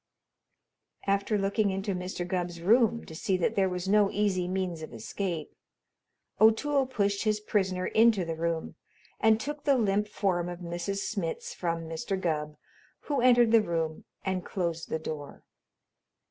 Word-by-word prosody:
After 200 +2 +1
looking 200 +1 +1
into 195 +1 -2
Mr. 180 -1 -4
Gubb's 175 -2 -2
room 230 +5 +3
to - - -10
see 185 +4 0
that 180 - +1
there 190 -1 +2
was 180 0 -4
no 205 0 +4
easy 195 -4 0
means 185 -3 -2
of 155 - -8
escape, 160 - -4 0.8
O'Toole 265 +5 +4
pushed 200 -5 0
his 215 -1 +1
prisoner 190 -3 0
into 220 -5 +4
the 165 - -2
room 165 0 -2 0.5
and 220 0 +4
took 295 +4 -5
the 280 -2 +4
limp 210 -2 +1
form 180 -4 -1
of 175 - -5
Mrs. 175 +3 -3
Smitz 190 -7 -3
from 165 -2 -2
Mr. 165 +4 -3
Gubb, 150 -4 -2 0.4
who 285 -4 -1
entered 240 -2 +5
the 230 -1 +7
room 165 -4 -2 0.2
and 185 -1 -1
closed 170 -3 -3
the - - 0
door. 155 -2 -7
190 Hz, 155 wpm, -29 LUFS, 170-210 Hz, 0.8 s, the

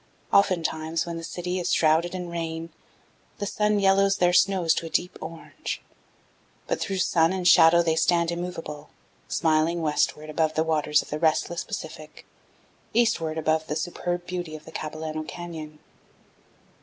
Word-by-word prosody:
Oftentimes, 165 -4 +2
when 170 -1 -5
the 165 - -7
city 180 +2 -3
is 180 - -1
shrouded 165 +3 +3
in 180 -1 -4
rain, 165 -1 -4 0.7
the 205 - -3
sun 210 +1 +1
yellows 195 0 +4
their 175 0 +3
snows 185 -3 +4
to 165 - -3
a - - -8
deep 180 +2 -1
orange; 165 +1 -6 0.9
but - - -2
through 195 - -2
sun 170 -2 +3
and 185 -2 -1
shadow 170 0 +7
they 160 -1 +1
stand 170 +1 +2
immovable, 165 -4 -6 0.4
smiling 160 +1 +1
westward 150 0 0
above 155 0 0
the 160 - +2
waters 150 -2 +2
of - - -15
the 150 - -2
restless 165 +1 +1
Pacific, - - -8 0.7
eastward 175 -10 +2
above 160 0 0
the 150 - -2
superb 175 +2 -3
beauty 175 -3 -5
of 155 - -11
the - - -11
Capilano 155 0 -5
Canyon. 155 -2 -8
165 Hz, 155 wpm, -26 LUFS, 155-180 Hz, 0.9 s, shadow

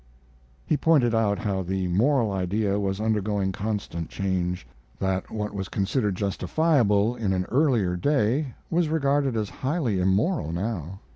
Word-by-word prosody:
He 155 - +1
pointed 140 -6 +3
out 105 -3 +1
that 95 -3 -1
the 95 0 -1
moral 115 +5 +2
idea 100 +2 0
was 95 -1 -1
undergoing 105 -3 0
constant 95 -5 -4
change; 90 -2 -2 0.3
that 95 -1 -1
what 105 -1 -4
was 95 -3 -4
considered 105 0 0
justifiable 110 - +2
in 105 -5 -1
an 90 -1 0
earlier 120 - +2
day 135 - +1 0.2
was 170 -1 +2
regarded 140 -5 +1
as 105 -2 -2
highly 135 - -1
immoral 95 - +1
now. 95 -1 -4
105 Hz, 140 wpm, -25 LUFS, 95-130 Hz, 0.3 s, pointed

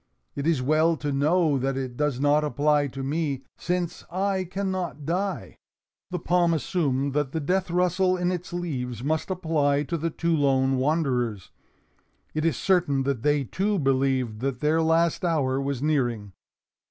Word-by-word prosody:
It 140 +2 -2
is 155 -6 +2
well 155 +4 +3
to 145 0 -3
know 150 +1 +2
that 135 +1 -1
it 130 -2 -4
does 150 -2 -1
not 145 +2 +3
apply 145 +1 +2
to 135 0 -6
me, 140 -1 -2
since 175 -1 -3
I 190 +1 -1
can 190 +2 -3
not 170 -6 -4
die." 190 +5 -2 0.5
The 180 - -2
palm 175 0 +2
assumed 140 -3 -1
that 145 -2 -1
the 160 - 0
death 180 +5 0
rustle 180 +1 +2
in 180 0 0
its 180 -1 -5
leaves 130 -9 -4
must 160 +4 -1
apply 155 -6 +1
to 170 +3 -3
the 165 +2 -1
two 165 +1 0
lone 135 -2 +2
wanderers. 130 - 0 0.8
It 155 +1 -1
is 165 -7 +1
certain 170 -8 +2
that 135 -4 -1
they 145 +1 +2
too 200 - -1
believed 130 - +1
that 130 0 -2
their 155 +3 +2
last 165 +1 +2
hour 140 -6 +1
was 140 -1 -2
nearing. 120 -9 0
150 Hz, 165 wpm, -25 LUFS, 135-170 Hz, 0.8 s, well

